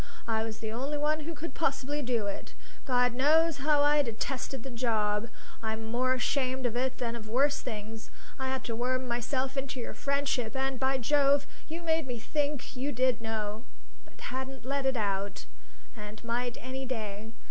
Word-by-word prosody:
I 220 Hz, -1 st, +2 dB
was 220 Hz, -1 st, -4 dB
the 220 Hz, -1 st, -2 dB
only 270 Hz, +6 st, -1 dB
one 300 Hz, +1 st, +2 dB
who 320 Hz, +2 st, -4 dB
could 330 Hz, +3 st, -5 dB
possibly 290 Hz, -2 st, 0 dB
do 240 Hz, -5 st, +1 dB
it. 200 Hz, -, -5 dB, 0.3 s
God 250 Hz, -2 st, +4 dB
knows 305 Hz, +4 st, +4 dB
how 290 Hz, 0 st, +4 dB
I 295 Hz, 0 st, +6 dB
detested 255 Hz, +1 st, -2 dB
the 270 Hz, -, -6 dB
job! 220 Hz, -2 st, +1 dB, 0.3 s
I'm 220 Hz, 0 st, -2 dB
more 255 Hz, +3 st, +2 dB
ashamed 260 Hz, 0 st, +1 dB
of 240 Hz, -1 st, +1 dB
it 255 Hz, +1 st, 0 dB
than 235 Hz, -1 st, -1 dB
of 215 Hz, -2 st, -7 dB
worse 275 Hz, +5 st, +3 dB
things. 220 Hz, -2 st, -5 dB, 0.3 s
I 265 Hz, -, -1 dB
had 265 Hz, 0 st, -1 dB
to 230 Hz, -, -2 dB
worm 255 Hz, +2 st, 0 dB
myself 260 Hz, +3 st, -1 dB
into 270 Hz, -1 st, -2 dB
your 235 Hz, -, -4 dB
friendship; 280 Hz, -4 st, 0 dB
and, 265 Hz, -1 st, 0 dB
by 265 Hz, 0 st, +3 dB
Jove, 280 Hz, +2 st, +4 dB, 0.2 s
you 330 Hz, +2 st, -5 dB
made 320 Hz, -3 st, +2 dB
me 245 Hz, -1 st, -2 dB
think 290 Hz, +4 st, -1 dB
you 270 Hz, +3 st, -1 dB
did 255 Hz, -2 st, +2 dB
know, 220 Hz, -1 st, -2 dB, 0.4 s
but -, -, -20 dB
hadn't 265 Hz, -1 st, -4 dB
let 275 Hz, 0 st, 0 dB
it 265 Hz, -2 st, +2 dB
out, 200 Hz, -2 st, -1 dB, 0.5 s
and 210 Hz, 0 st, -8 dB
might 240 Hz, +1 st, -1 dB
any 260 Hz, +2 st, -4 dB
day. 220 Hz, -2 st, -4 dB
255 Hz, 180 wpm, -31 LUFS, 225-275 Hz, 0.5 s, I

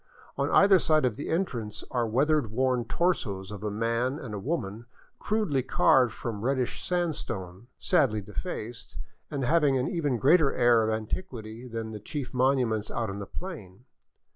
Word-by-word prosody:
On -, -, 0 dB
either 195 Hz, -1 st, +6 dB
side 155 Hz, -4 st, +3 dB
of 120 Hz, -4 st, 0 dB
the 145 Hz, -, -6 dB
entrance 125 Hz, -, -2 dB
are 120 Hz, -2 st, +1 dB
the -, -, -4 dB
weather 150 Hz, +6 st, +3 dB
worn 125 Hz, +1 st, 0 dB
torsos 105 Hz, -, -1 dB
of 105 Hz, -1 st, -7 dB
a 105 Hz, -, -1 dB
man 115 Hz, +5 st, -1 dB
and 125 Hz, -8 st, -7 dB
a 105 Hz, -, -3 dB
woman, 115 Hz, -, -3 dB, 0.3 s
crudely 210 Hz, -11 st, 0 dB
carved 130 Hz, -1 st, +4 dB
from 110 Hz, -2 st, -5 dB
reddish 130 Hz, +1 st, -1 dB
sandstone, 120 Hz, -, -2 dB
sadly 140 Hz, -, +2 dB
defaced, 110 Hz, -, -6 dB, 0.3 s
and 140 Hz, -3 st, -3 dB
having 150 Hz, -2 st, +3 dB
an 130 Hz, -, 0 dB
even 145 Hz, -7 st, 0 dB
greater 145 Hz, +3 st, +4 dB
air 120 Hz, -2 st, +5 dB
of 110 Hz, -, 0 dB
antiquity 110 Hz, +1 st, -4 dB
than 115 Hz, -2 st, -5 dB
the 105 Hz, -, -6 dB
chief 135 Hz, +6 st, -5 dB
monuments 125 Hz, -5 st, +1 dB
out 115 Hz, -4 st, -2 dB
on 100 Hz, -, -6 dB
the 100 Hz, -, -6 dB
plain. 125 Hz, -, -8 dB
125 Hz, 165 wpm, -28 LUFS, 110-145 Hz, 0.3 s, either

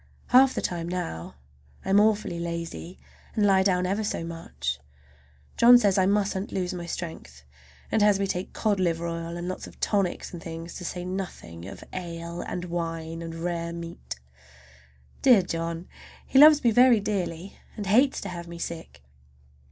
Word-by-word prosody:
Half 260 Hz, +1 st, +6 dB
the -, -, -1 dB
time 170 Hz, -1 st, -2 dB
now 85 Hz, -, -4 dB, 0.5 s
I -, -, -1 dB
am 200 Hz, -, +6 dB
awfully 210 Hz, -5 st, +2 dB
lazy, 170 Hz, +1 st, -5 dB, 0.4 s
and 210 Hz, -, +3 dB
lie 195 Hz, -1 st, +5 dB
down 185 Hz, -2 st, +2 dB
ever 200 Hz, +4 st, 0 dB
so 205 Hz, -, -2 dB
much. 165 Hz, -, -4 dB, 0.8 s
John 245 Hz, +1 st, +9 dB
says 200 Hz, -5 st, +3 dB
I 185 Hz, -, +4 dB
musn't 200 Hz, -1 st, 0 dB
lose 180 Hz, -2 st, -2 dB
my 175 Hz, -1 st, -6 dB
strength, 115 Hz, -, -7 dB, 0.5 s
and 220 Hz, -, +2 dB
has 205 Hz, -1 st, +5 dB
me 200 Hz, -, +1 dB
take 185 Hz, -1 st, -3 dB
cod 210 Hz, -3 st, 0 dB
liver 170 Hz, -2 st, 0 dB
oil 165 Hz, 0 st, -4 dB
and 175 Hz, +1 st, -5 dB
lots 185 Hz, -, -5 dB
of -, -, -15 dB
tonics 195 Hz, -4 st, 0 dB
and 170 Hz, -, -7 dB
things, 165 Hz, 0 st, -7 dB
to 180 Hz, -, -7 dB
say 180 Hz, +1 st, -4 dB
nothing 180 Hz, -, -6 dB
of 100 Hz, -, -9 dB
ale 170 Hz, -1 st, -5 dB
and 180 Hz, 0 st, -4 dB
wine 165 Hz, -1 st, -4 dB
and 165 Hz, 0 st, -6 dB
rare 170 Hz, 0 st, -3 dB
meat. 170 Hz, -, -7 dB, 1.1 s
Dear 240 Hz, -8 st, +6 dB
John! 165 Hz, 0 st, -4 dB, 0.4 s
He 265 Hz, -, +3 dB
loves 300 Hz, 0 st, +8 dB
me 235 Hz, -, +5 dB
very 245 Hz, 0 st, +6 dB
dearly, 195 Hz, -3 st, -3 dB, 0.2 s
and 205 Hz, -, -4 dB
hates 250 Hz, +8 st, +4 dB
to 200 Hz, -, -5 dB
have 170 Hz, -1 st, -7 dB
me 170 Hz, 0 st, -8 dB
sick. 165 Hz, -, -7 dB
180 Hz, 175 wpm, -26 LUFS, 170-200 Hz, 1.1 s, John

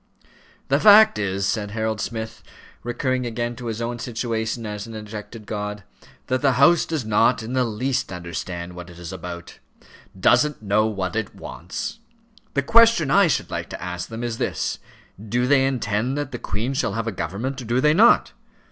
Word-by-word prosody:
"The -, -, +3 dB
fact 215 Hz, -, +7 dB
is," 100 Hz, -1 st, -1 dB
said 105 Hz, 0 st, -1 dB
Harold 110 Hz, 0 st, -2 dB
Smith, 110 Hz, 0 st, -5 dB, 0.4 s
recurring 125 Hz, +1 st, -1 dB
again 120 Hz, +1 st, -3 dB
to 120 Hz, -1 st, -6 dB
his 115 Hz, +1 st, -3 dB
own 120 Hz, 0 st, -3 dB
situation 115 Hz, -1 st, -3 dB
as 105 Hz, 0 st, -5 dB
an 115 Hz, -, -8 dB
ejected 105 Hz, +1 st, -8 dB
god, 105 Hz, -1 st, -4 dB, 0.4 s
"that 130 Hz, 0 st, -1 dB
the 140 Hz, -2 st, +3 dB
House 150 Hz, +7 st, +5 dB
does 155 Hz, -8 st, -2 dB
not 110 Hz, +2 st, +3 dB
in 115 Hz, +3 st, -5 dB
the 130 Hz, -1 st, +2 dB
least 125 Hz, +3 st, -2 dB
understand 85 Hz, 0 st, -5 dB
what 90 Hz, 0 st, -9 dB
it 85 Hz, -, -13 dB
is 85 Hz, -2 st, -7 dB
about; 85 Hz, -1 st, -8 dB, 0.6 s
doesn't 150 Hz, +5 st, +3 dB
know 105 Hz, +2 st, +2 dB
what 95 Hz, -4 st, -3 dB
it 110 Hz, -2 st, -3 dB
wants. 90 Hz, -, -6 dB, 0.6 s
The 140 Hz, -, +2 dB
question 225 Hz, -, +5 dB
I 200 Hz, +3 st, +6 dB
should 160 Hz, -, -1 dB
like -, -, -4 dB
to -, -, -7 dB
ask 90 Hz, 0 st, -5 dB
them 115 Hz, +1 st, -6 dB
is 115 Hz, -1 st, -3 dB
this: -, -, -2 dB, 0.4 s
do 120 Hz, +3 st, 0 dB
they 135 Hz, 0 st, +4 dB
intend 125 Hz, 0 st, -1 dB
that 145 Hz, -2 st, -3 dB
the 125 Hz, -, -5 dB
Queen 110 Hz, +8 st, -3 dB
shall 130 Hz, -, 0 dB
have 115 Hz, +1 st, -2 dB
a 115 Hz, -, -1 dB
government, 110 Hz, -, -4 dB
or -, -, -8 dB
do 120 Hz, +3 st, +1 dB
they 150 Hz, +3 st, +4 dB
not? 225 Hz, +8 st, +5 dB
115 Hz, 185 wpm, -23 LUFS, 105-130 Hz, 0.6 s, fact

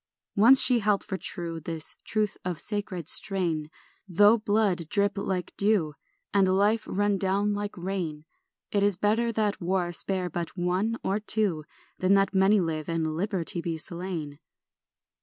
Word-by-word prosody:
(Once 235 Hz, +6 st, +7 dB
she 250 Hz, -2 st, +6 dB
held 205 Hz, -2 st, +1 dB
for 200 Hz, -, -4 dB
true 170 Hz, -3 st, -5 dB
This 160 Hz, 0 st, -4 dB
truth 215 Hz, -2 st, -1 dB
of 180 Hz, -3 st, -4 dB
sacred 205 Hz, -6 st, -4 dB
strain; 170 Hz, -6 st, 0 dB, 0.4 s
Though 205 Hz, +5 st, +5 dB
blood 205 Hz, -6 st, 0 dB
drip 205 Hz, 0 st, +1 dB
like 190 Hz, -3 st, -3 dB
dew 200 Hz, -7 st, +1 dB, 0.4 s
And 195 Hz, -2 st, +4 dB
life 215 Hz, +2 st, +2 dB
run 205 Hz, 0 st, 0 dB
down 200 Hz, +2 st, +1 dB
like 205 Hz, -1 st, -4 dB
rain, 175 Hz, -5 st, -4 dB, 0.5 s
It 200 Hz, -, +1 dB
is 200 Hz, -2 st, +2 dB
better 225 Hz, +4 st, +1 dB
that 210 Hz, -3 st, -1 dB
war 175 Hz, 0 st, -1 dB
spare 185 Hz, +1 st, 0 dB
but 170 Hz, +1 st, -5 dB
one 185 Hz, +6 st, 0 dB
or 195 Hz, +2 st, 0 dB
two 205 Hz, -7 st, 0 dB, 0.3 s
Than 185 Hz, +2 st, +3 dB
that 195 Hz, 0 st, +2 dB
many 195 Hz, +2 st, +4 dB
live, 160 Hz, -3 st, -3 dB
and 160 Hz, -2 st, -1 dB
liberty 180 Hz, -2 st, -2 dB
be 165 Hz, -1 st, -3 dB
slain.) 165 Hz, -3 st, -4 dB
190 Hz, 155 wpm, -27 LUFS, 170-205 Hz, 0.5 s, Once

